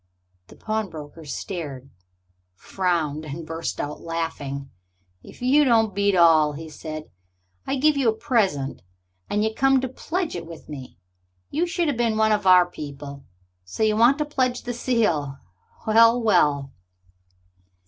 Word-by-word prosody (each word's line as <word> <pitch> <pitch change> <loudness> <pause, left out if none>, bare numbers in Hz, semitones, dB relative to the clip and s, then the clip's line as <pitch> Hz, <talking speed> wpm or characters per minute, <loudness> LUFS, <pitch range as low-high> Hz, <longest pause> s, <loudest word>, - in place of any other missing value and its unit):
The - - -15
pawnbroker 165 -8 -5
stared, 140 -3 -6 0.6
frowned, 160 - -1
and 155 +2 -7
burst 165 +1 -4
out 145 +1 -4
laughing. 145 -5 -4 0.5
"If - - -13
you 280 +4 +5
don't 225 -5 +3
beat 200 0 +2
all!" 160 -4 +5
he 160 +2 -8
said. 155 0 -8 0.6
"I - - 0
give 300 +3 +3
you 270 -4 +2
a - - +2
present, 195 - 0 0.5
and 210 +1 +1
you 220 0 0
come 270 +2 +3
to 260 - -2
pledge 330 +7 -3
it 170 -1 -6
with 165 -1 -11
me! 135 - -9 0.5
You 335 +5 0
should 345 -1 -1
have 285 -5 -1
been 230 -2 +1
one 220 0 +3
of 210 -2 +1
our 180 -1 +7
people! 140 -4 -9 0.4
So 90 - -3
you 215 -1 +3
want 240 +5 +5
to 300 - -1
pledge 255 -4 -1
the 245 - -4
seal. 210 - 0 0.5
Well, 230 +2 +5
well!" 150 - +2
185 Hz, 150 wpm, -24 LUFS, 150-235 Hz, 0.6 s, our